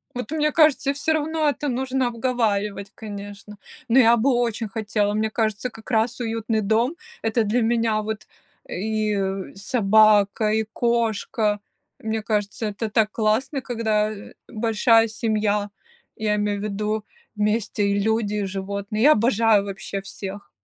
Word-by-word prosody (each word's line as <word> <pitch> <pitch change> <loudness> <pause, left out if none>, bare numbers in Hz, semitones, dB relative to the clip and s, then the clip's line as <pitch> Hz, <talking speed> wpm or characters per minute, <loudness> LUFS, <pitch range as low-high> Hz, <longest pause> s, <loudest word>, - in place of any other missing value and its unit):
Вот 250 +3 -5
мне 300 -1 +1
кажется, 300 -3 +3
всё 295 +3 0
равно 315 0 0
это 290 +1 -3
нужно 260 0 0
обговаривать, 215 -5 -1
конечно. 205 -1 -9 0.3
Но 240 +3 +5
я 235 -1 +6
бы 255 +4 +2
очень 235 -2 0
хотела. 210 0 -1
Мне 215 +1 0
кажется, 220 +1 -1
как 225 +1 -12
раз 225 +2 +1
уютный 225 -1 -1
дом- 225 +8 +1 0.3
это 225 +1 +1
для 220 +4 +1
меня 225 -1 +1
вот 215 0 -5 0.4
и, 215 +2 -1
э, 195 -1 -3
собака, 210 0 +3
и 220 +1 +1
кошка. 225 -2 0 0.4
Мне 220 0 -2
кажется, 210 0 -2
это 210 +2 -3
так 215 -1 +2
классно, 235 +6 0
когда, 220 -4 0
э, 205 -2 -10
большая 225 +1 +3
семья, 215 -2 0 0.5
я 215 -1 0
имею 205 -1 -1
в - - -6
виду 210 +1 -2 0.3
вместе 210 0 0
и 200 0 +1
люди, 220 0 0
и 205 -1 -1
животные. 200 +2 -4
Я 300 - +8
обожаю 225 -3 +3
вообще 195 0 -5
всех. 195 -2 -8
220 Hz, 150 wpm, -23 LUFS, 205-235 Hz, 0.5 s, Я